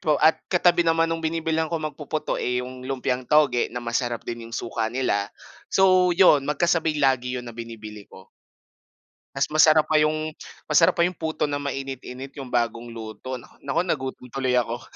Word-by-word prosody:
pro 150 Hz, -2 st, +2 dB
at 160 Hz, -, +4 dB
katabi 175 Hz, -1 st, +3 dB
naman 165 Hz, -1 st, +3 dB
nung 165 Hz, 0 st, -2 dB
binibilhan 160 Hz, 0 st, -1 dB
kong 155 Hz, -2 st, -3 dB
magpuputo, 150 Hz, +1 st, -3 dB
eh, 125 Hz, 0 st, -1 dB
yung 130 Hz, 0 st, -9 dB
lumpiang 130 Hz, -1 st, -2 dB
toge 145 Hz, -5 st, +3 dB
na -, -, -11 dB
masarap 120 Hz, 0 st, -2 dB
din 115 Hz, -1 st, -6 dB
yung 115 Hz, -, -5 dB
suka 115 Hz, -1 st, -2 dB
nila, 110 Hz, -5 st, -1 dB, 0.4 s
so 185 Hz, -1 st, +4 dB
'yon 150 Hz, -7 st, +5 dB
magkasabay 160 Hz, +1 st, +1 dB
lagi 130 Hz, -3 st, +1 dB
'yon 125 Hz, -, -5 dB
na 120 Hz, -, -8 dB
binibili 110 Hz, -3 st, -9 dB
ko. 95 Hz, -, -15 dB, 1.1 s
Mas 135 Hz, 0 st, +1 dB
masarap 155 Hz, 0 st, +5 dB
pa 155 Hz, -, -1 dB
yung 155 Hz, 0 st, -1 dB, 0.3 s
masarap 155 Hz, +2 st, +4 dB
pa 170 Hz, -, +5 dB
yung 180 Hz, -, -3 dB
puto 160 Hz, -2 st, -2 dB
na 145 Hz, -1 st, -3 dB
mainit-init 135 Hz, -1 st, -6 dB
yung 135 Hz, -3 st, -7 dB
bagong 120 Hz, 0 st, -1 dB
luto 115 Hz, +3 st, -7 dB
naku -, -, -18 dB
naku 140 Hz, +4 st, 0 dB
nagutom 130 Hz, -6 st, -3 dB
tuloy 130 Hz, 0 st, -1 dB
ako. 120 Hz, 0 st, -2 dB
135 Hz, 175 wpm, -24 LUFS, 120-155 Hz, 1.1 s, yon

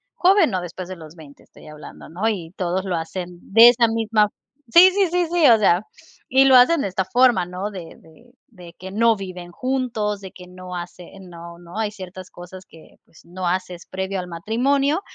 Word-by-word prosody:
Joven, 370 Hz, -3 st, +3 dB
no, 185 Hz, -4 st, -2 dB
después 180 Hz, +1 st, -8 dB
de 185 Hz, -, -7 dB
los 160 Hz, 0 st, -13 dB
20, 150 Hz, -3 st, -16 dB
estoy -, -, -18 dB
hablando, 150 Hz, 0 st, -12 dB
¿no? 185 Hz, +7 st, -3 dB
Y 175 Hz, -6 st, -5 dB
todos 185 Hz, +1 st, -2 dB
lo 180 Hz, -2 st, -2 dB
hacen 175 Hz, +2 st, -6 dB
de 230 Hz, +4 st, +7 dB
esa 240 Hz, -1 st, +3 dB
misma 220 Hz, -2 st, +1 dB, 0.4 s
sí, 365 Hz, +2 st, +8 dB
sí, 390 Hz, -1 st, +1 dB, 0.2 s
sí, 335 Hz, -2 st, +1 dB
o 225 Hz, -2 st, +5 dB
sea, 180 Hz, -2 st, +3 dB, 0.5 s
y 265 Hz, +1 st, +4 dB
lo 265 Hz, -, +6 dB
hacen 255 Hz, +6 st, +5 dB
de -, -, -2 dB
esta 190 Hz, 0 st, -2 dB
forma, 240 Hz, -2 st, +2 dB
¿no? 185 Hz, +3 st, -5 dB
De 180 Hz, -5 st, -10 dB
de 200 Hz, +10 st, -21 dB, 0.2 s
de 180 Hz, -6 st, -15 dB
que 190 Hz, +1 st, -9 dB
no 225 Hz, +1 st, +2 dB
viven 180 Hz, -2 st, -9 dB
juntos, 235 Hz, -4 st, -3 dB
de 190 Hz, -, -10 dB
que 180 Hz, -1 st, -14 dB
no 180 Hz, 0 st, -10 dB
hacen 180 Hz, +2 st, -11 dB
no 170 Hz, 0 st, -11 dB
no 175 Hz, +3 st, -12 dB
hay 220 Hz, -2 st, -2 dB
ciertas 185 Hz, -3 st, -11 dB
cosas 180 Hz, +1 st, -12 dB
que, 160 Hz, -, -19 dB
pues, 160 Hz, -, -22 dB
no 180 Hz, +1 st, -7 dB
haces 180 Hz, -1 st, -4 dB
previo 190 Hz, +1 st, -4 dB
al 180 Hz, -, -9 dB
matrimonio. 275 Hz, -, 0 dB
190 Hz, 200 wpm, -21 LUFS, 175-230 Hz, 0.5 s, sí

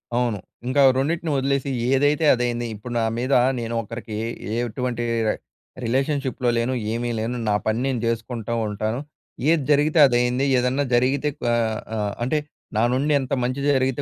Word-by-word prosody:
అవును. 120 Hz, -3 st, +1 dB, 0.3 s
ఇంకా 135 Hz, +3 st, +3 dB, 0.2 s
రెండిటిని 160 Hz, +4 st, 0 dB
వదిలేసి, 140 Hz, 0 st, 0 dB, 0.2 s
ఏదైతే 145 Hz, +4 st, +3 dB
అదైంది. 120 Hz, -1 st, -1 dB
ఇప్పుడు 120 Hz, +4 st, -7 dB
నా -, -, +1 dB
మీద 130 Hz, +3 st, 0 dB, 0.3 s
నేను 115 Hz, 0 st, -4 dB
ఒకరికి, 115 Hz, 0 st, -7 dB, 0.4 s
ఏటువంటి 120 Hz, 0 st, -2 dB, 0.2 s
రె -, -, +2 dB, 0.5 s
రిలేషన్షిప్‌లో 130 Hz, +1 st, 0 dB
లేను, 120 Hz, +2 st, 0 dB, 0.2 s
ఏమీ 120 Hz, +1 st, -2 dB
లేను. 115 Hz, +3 st, -2 dB
నా 105 Hz, -, +3 dB
పని 110 Hz, +1 st, +1 dB
నేను 130 Hz, -3 st, -1 dB
జేసుకుంటో 115 Hz, 0 st, -2 dB
ఉంటాను. 110 Hz, +3 st, -2 dB, 0.5 s
ఏది 165 Hz, -3 st, +3 dB
జరిగితే 150 Hz, +3 st, +3 dB
అదైంది. 125 Hz, +1 st, +1 dB
ఏదన్నా 125 Hz, +3 st, +1 dB
జరిగితే 135 Hz, +4 st, +2 dB
క్వ -, -, -3 dB, 0.5 s
ఆహ్, 105 Hz, -2 st, -1 dB
అంటే 155 Hz, +5 st, +1 dB, 0.4 s
నా 110 Hz, -, +3 dB
నుండి 140 Hz, +4 st, +1 dB
ఎంత 135 Hz, +1 st, -4 dB
మంచి 130 Hz, +3 st, -1 dB
జరిగితే 130 Hz, 0 st, +1 dB
125 Hz, 150 wpm, -23 LUFS, 115-135 Hz, 0.5 s, ఇంకా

